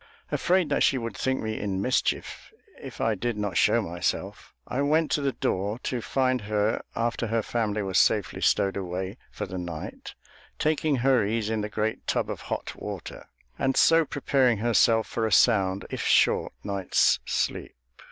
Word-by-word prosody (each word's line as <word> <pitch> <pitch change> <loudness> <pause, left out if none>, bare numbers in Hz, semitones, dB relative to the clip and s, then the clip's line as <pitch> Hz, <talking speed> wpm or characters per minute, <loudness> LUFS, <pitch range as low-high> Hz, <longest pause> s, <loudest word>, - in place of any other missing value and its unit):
Afraid 180 -2 +2
that - - +1
she 135 - +4
would 115 -4 -5
think 130 0 -1
me 110 0 -3
in 100 -2 -2
mischief 125 +6 -1 0.3
if - - -9
I 115 - +1
did 115 +2 -3
not 105 -4 -3
show - - +3
myself, 85 0 -3
I 130 - -2
went 155 +2 +2
to 150 - +1
the 140 -1 +1
door, 100 +4 -1
to 125 -2 -2
find 130 0 0
her, 105 +1 0
after 115 0 -1
her 115 0 0
family 110 -3 -1
was 95 -1 +1
safely 105 -4 +1
stowed 95 -1 +2
away 95 0 -4
for - - -5
the 95 - -6
night, 85 -3 -7 0.4
taking 155 -1 +1
her 130 -2 +3
ease 110 +1 -1
in 110 -1 -1
the 105 - -4
great 110 +1 -3
tub - - 0
of - - -6
hot - - -4
water, - - -8 0.3
and 135 -1 +1
so 165 0 +6
preparing 135 -5 +1
herself 115 0 +3
for 110 +3 -2
a - - -4
sound, 95 -4 +3
if - - -3
short, - - +3
night's 100 -2 +2
sleep. - - -2
110 Hz, 175 wpm, -26 LUFS, 100-130 Hz, 0.4 s, so